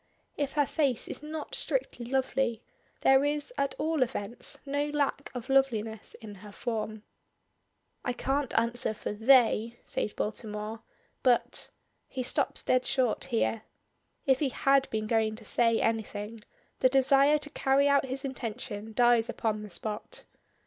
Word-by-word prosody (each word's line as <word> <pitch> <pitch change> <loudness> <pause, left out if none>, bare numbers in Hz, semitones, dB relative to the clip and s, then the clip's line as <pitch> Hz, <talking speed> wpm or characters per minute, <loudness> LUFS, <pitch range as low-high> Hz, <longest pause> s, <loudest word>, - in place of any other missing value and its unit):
If 285 -2 -2
her 290 -1 +3
face 275 -5 0
is - - -6
not 305 0 -6
strictly - - -2
lovely, 260 -2 0 0.4
there 270 +1 +5
is, 295 +9 -1
at 280 - -1
all 315 -2 0
events, 235 -3 -1
no 285 +1 0
lack 285 -1 -1
of 245 - -5
loveliness 225 -6 +1
in 215 -2 -10
her 210 -1 -10
form. 215 -1 -4 1.0
"I 245 - 0
can't 270 +1 -1
answer 235 -1 +1
for - - -4
'they,'" 235 0 +4
says 210 - -2
Baltimore, 215 +1 -4 0.4
"but" 250 -2 +2 0.4
he 260 - -4
stops 250 - 0
dead 255 0 +2
short 250 -4 +1
here. 225 -1 0 0.6
If 265 -1 +4
he 290 - +1
had 275 +1 +2
been 215 -1 -2
going 220 -1 +1
to 220 0 -12
say 230 +1 +3
anything, 220 0 -2 0.4
the 255 - +5
desire 275 +2 +5
to 295 0 -6
carry 275 +1 +3
out 280 -1 +4
his 265 +1 -3
intention 220 -4 -5
dies 240 0 +4
upon 215 -2 -1
the 210 - -8
spot. 215 - -5
245 Hz, 150 wpm, -29 LUFS, 220-275 Hz, 1.0 s, there